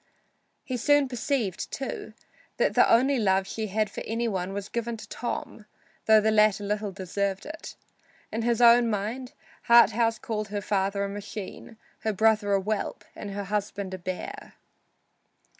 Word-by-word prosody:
He 255 - -3
soon 290 +3 +3
perceived, 245 -5 -2
too, 235 -4 -5 0.4
that - - +2
the - - +5
only 260 +3 +4
love 190 -2 +2
she 220 +2 -4
had 215 +2 0
for - - -7
any 230 +1 -1
one 190 -3 -2
was 200 0 -4
given 235 0 -3
to - - -10
Tom, 225 -2 -5 0.4
though 220 0 +7
the 220 +1 +2
latter 210 -1 +4
little 205 0 -2
deserved 195 +1 -3
it. 315 +2 -8 0.6
In 225 - -2
his 235 0 +1
own 235 0 +7
mind 230 +6 -3 0.3
Harthouse 230 -1 +5
called 215 -2 -3
her 205 0 -3
father 200 0 0
a - - -1
machine, 205 +2 -8 0.2
her 220 - -1
brother 215 0 +3
a 195 - +4
whelp 210 +2 -3
and 205 - -7
her 200 0 -4
husband 200 -1 -3
a 185 - -5
bear. 185 - -6
215 Hz, 160 wpm, -27 LUFS, 200-235 Hz, 0.6 s, though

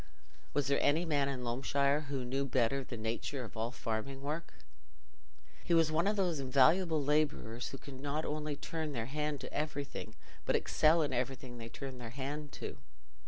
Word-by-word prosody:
Was 145 -1 +3
there 140 0 +3
any 160 +5 +3
man 145 -4 +2
in 130 -2 -3
Loamshire 140 +4 +1
who 135 -3 -2
knew 135 +3 0
better 135 0 +2
the 125 -2 -6
"natur" 115 +4 -2
of 115 - -9
all 110 +1 -1
farming 130 +3 -3
work? 155 +4 -3 1.1
He 170 - +3
was 165 -1 +5
one 165 +4 +3
of 210 - +3
those 180 -6 +1
invaluable 150 +5 +4
labourers 145 -6 +1
who 135 - -6
can 135 -2 -10
not 145 +2 -1
only 150 -1 -2
turn 160 +1 -3
their 115 -3 -2
hand 150 +2 -1
to - - -7
everything, 145 -2 -3 0.3
but - - +2
excel 160 +1 +4
in 145 - -1
everything 125 -1 -2
they 115 0 -6
turn 130 +1 -7
their 120 -2 -6
hand 140 +3 -4
to. - - -6
140 Hz, 180 wpm, -34 LUFS, 130-150 Hz, 1.1 s, was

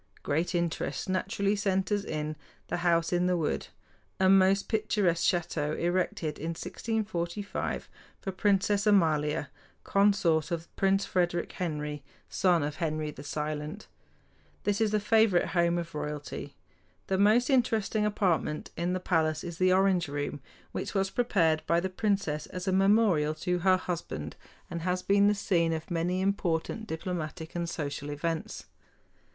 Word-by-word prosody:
Great 160 +5 0
interest 170 +2 -2
naturally 195 +2 0
centers 200 0 0
in 155 -3 -3 0.3
"The - - -1
House 170 -1 +2
in 175 0 +2
the 180 -1 +2
Wood," 160 -3 -1 0.5
a 190 0 +4
most 195 0 +5
picturesque 210 -6 +1
château 155 -3 -1
erected 175 -3 -1
in 165 +2 -3
1645 205 -3 -3 0.3
for 195 - -4
Princess 200 +1 +2
Amalia, 150 -7 +2 0.3
consort 195 -6 +3
of 170 -1 -5
Prince 195 0 +2
Frederick 175 -1 0
Henry, 150 -4 -4 0.2
son 175 -4 +2
of 145 +1 -3
Henry 155 -2 -2
the 140 - -10
Silent. 150 +5 -4 0.8
This 205 +1 0
is 220 - +3
the 210 0 +1
favorite 215 -3 +3
home 170 -1 +2
of 170 -1 -4
royalty. 150 -1 -5 0.5
The 190 -1 0
most 225 +6 +4
interesting 220 -4 +2
apartment 185 -7 0
in 175 +2 -1
the 185 - -1
palace 160 -4 +1
is 170 -2 -7
the 185 0 +4
Orange 185 -2 +3
Room, 145 0 -3 0.3
which - - -4
was 195 0 +1
prepared 165 -10 +2
by 170 - +3
the 185 +1 -3
princess 190 -7 -1
as 180 +1 -6
a - - +3
memorial 190 -6 +3
to 180 +3 -1
her 185 +1 +4
husband, 170 - -5 0.3
and 170 0 -5
has 180 +1 -1
been 200 +1 +4
the 210 - +3
scene 170 -5 +1
of 160 +3 -5
many 175 +2 0
important 195 +2 -1
diplomatic 160 -2 -4
and 170 -1 -2
social 145 -2 -4
events. 160 +2 -3
175 Hz, 145 wpm, -29 LUFS, 160-195 Hz, 0.8 s, most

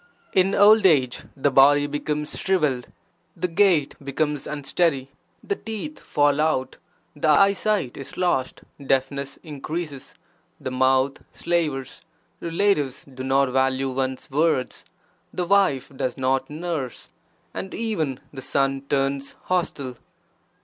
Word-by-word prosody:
(In 190 +1 +3
old 210 0 +7
age) 135 -7 +2
the 140 +1 +2
body 145 +2 +6
becomes 150 +1 -3
shrivelled, 150 -10 0 0.5
the 180 +2 0
gait 175 -5 +3
becomes 145 +1 -1
unsteady, 145 -1 0 0.3
the 200 - -1
teeth 225 +10 -6
fall 145 0 +2
out, 155 -4 0 0.4
the 150 +1 0
eye 195 +6 +6
sight 200 - -1
is 135 - -9
lost, 175 -8 0 0.2
deafness 135 +1 -1
increases, 150 -1 -6 0.4
the 130 - -5
mouth 130 +1 +2
slavers, 155 -7 -2 0.4
relatives 165 -6 0
do 130 -2 -9
not 135 0 +2
value 130 0 +1
(one's) 130 0 -3
words, 150 -3 0 0.5
the 180 - -2
wife 185 -10 +2
does 130 -2 -2
not 130 0 0
nurse, 155 -4 -5 0.4
and 190 - -5
even 165 - -2
the 135 - -7
son 135 +1 0
turns 140 0 -1
hostile. 140 -8 -2
145 Hz, 120 wpm, -24 LUFS, 135-170 Hz, 0.5 s, old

